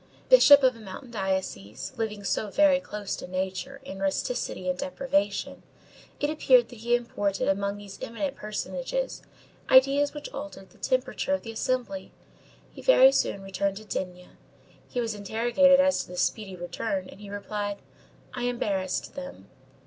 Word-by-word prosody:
Bishop 290 - +9
of 255 -1 +4
a - - -13
mountain 220 +5 -9
diocese, 190 - -3
living 215 -3 -3
so 205 +1 -1
very 285 +4 +4
close 210 -6 -5
to - - -7
nature, 190 +9 -4
in 195 - -7
rusticity 195 0 -2
and 180 - +1
deprivation, 235 -8 -1 0.6
it 290 - +1
appeared 260 -5 +4
that 240 - -12
he 240 +2 +2
imported 205 -5 -1
among 200 +1 0
these 200 -1 -10
eminent 270 +5 -3
personages, - - -3 0.5
ideas 275 +2 +5
which 295 - -6
altered 275 -10 -8
the - - -22
temperature 260 +2 0
of - - -7
the 225 - -6
assembly. 225 -4 -2 0.6
He - - -10
very 270 - +7
soon 200 -7 0
returned 195 0 -2
to 215 - -10
D—— 180 -3 -5 0.6
He 245 - -3
was 230 -2 -1
interrogated 240 +7 +4
as 280 0 +3
to - - -9
this 180 0 -1
speedy 195 -1 -2
return, 185 +2 -3
and 200 - -13
he 205 - -9
replied: 205 0 -4 0.6
_"I 245 -1 -3
embarrassed 200 -6 -1
them. 275 0 -9
220 Hz, 155 wpm, -27 LUFS, 195-270 Hz, 0.6 s, Bishop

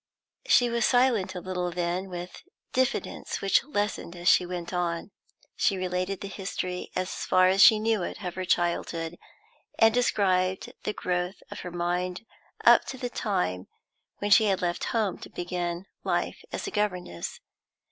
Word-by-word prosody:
She 245 0 +5
was 235 0 0
silent 245 -7 +2
a - - -3
little, 180 -1 -2
then, 175 +2 -2
with 180 0 -7 0.3
diffidence 260 0 -1
which 195 -1 +3
lessened 205 - -2
as 175 0 -5
she 180 - +5
went 175 0 -5
on, 175 +1 -2 0.4
she 195 - +2
related 185 +1 -2
the 200 - -4
history, 185 -2 -4
as 185 0 -1
far 185 0 +5
as 190 +1 +3
she 220 - +9
knew 220 -1 +1
it, 180 - -5
of 180 -1 -3
her 185 - -4
childhood, 170 -1 -1 0.6
and 225 0 +6
described 190 -6 +1
the 210 - -1
growth 180 0 -2
of - - -6
her 180 - -6
mind 180 +3 -2 0.4
up - - +7
to 265 - -6
the 245 -1 -4
time 90 - -1 0.5
when 205 0 -2
she 220 +2 +7
had 195 -3 +2
left 175 -1 -1
home 215 -5 0
to - - -10
begin 175 0 -3 0.2
life - - -1
as - - -4
a 395 - -4
governess. 180 - -2
185 Hz, 165 wpm, -27 LUFS, 175-205 Hz, 0.6 s, she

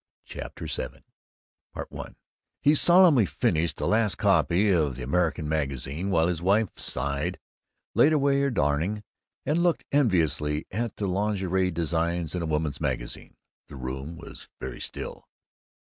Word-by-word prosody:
CHAPTER - - -8
VII - - -4 0.7
I - - -6 0.5
He 145 - +4
solemnly 170 - +6
finished 80 +1 0
the - - -2
last 110 -2 +2
copy 95 0 +3
of 75 -7 +2
the 65 - -6
American 80 +3 0
Magazine, 75 +3 -2
while 85 -3 +3
his 85 -2 -2
wife 100 +3 +3
sighed, 70 +7 -2 0.6
laid 150 - +5
away 140 -2 +3
her 140 - +2
darning, 90 - 0 0.4
and 155 +5 +1
looked 175 -1 +1
enviously 80 - +1
at 115 +1 -2
the 105 - -3
lingerie 95 -1 0
designs 85 0 -1
in 90 - -2
a 85 - -2
women's 75 -2 -1
magazine. 65 -5 -4 0.3
The - - -11
room 65 +5 -6
was - - -11
very - - -6
still. 485 -1 -6
85 Hz, 140 wpm, -26 LUFS, 75-105 Hz, 0.7 s, solemnly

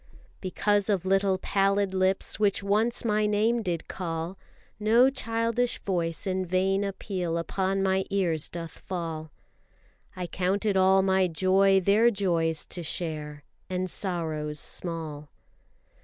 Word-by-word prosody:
Because 205 +2 0
of 190 -3 +1
little 195 0 +2
pallid 195 0 +1
lips, 190 +1 +1
which 200 -1 +2
once 215 +5 +1
My 210 -1 +2
name 220 +3 +2
did 175 -5 -3
call, 165 0 -4 0.4
No 230 +5 +5
childish 230 -1 -1
voice 170 -3 -2
in 190 -1 -1
vain 190 +2 +1
appeal 185 -4 -3
upon 190 +3 -1
My 190 0 +2
ears 175 -6 0
doth 170 -1 -6
fall. 165 -4 -5 0.9
I 180 - -4
count 185 +4 -1
it 205 -2 +2
all 190 0 +5
my 190 -1 +3
joy 190 +3 +3
their 210 +5 +4
joys 170 -7 0
to 175 - -5
share, 150 -3 -4 0.3
And 185 0 -1
sorrows 155 -5 -2
small. 155 -4 -3
190 Hz, 130 wpm, -27 LUFS, 170-200 Hz, 0.9 s, No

